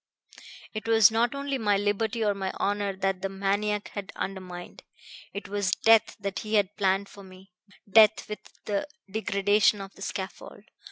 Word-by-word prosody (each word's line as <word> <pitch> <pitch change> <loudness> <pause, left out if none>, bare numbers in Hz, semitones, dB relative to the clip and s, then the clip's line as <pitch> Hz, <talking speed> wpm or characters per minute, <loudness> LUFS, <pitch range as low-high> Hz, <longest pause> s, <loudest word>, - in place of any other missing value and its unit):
It 215 +1 -5
was 225 -3 +6
not 235 +4 +1
only 280 -1 -2
my 205 -3 +2
liberty 215 +3 0
or 205 - +2
my 195 -1 -3
honor 200 -1 -1
that 195 -1 -1
the 195 - -2
maniac 200 +2 -1
had 200 -2 -6
undermined. 180 -2 -6 0.5
It 200 - -7
was 200 -2 0
death 225 -1 +4
that 200 -1 -3
he 215 0 -2
had 205 -1 +2
planned 195 0 +1
for 200 - -13
me; 185 0 -15 0.4
death 215 +1 +5
with 210 - -5 0.3
the 205 +7 -1 0.2
degradation 205 0 +2
of 195 0 -8
the - - -17
scaffold. 190 -1 -6
205 Hz, 165 wpm, -27 LUFS, 195-215 Hz, 0.5 s, was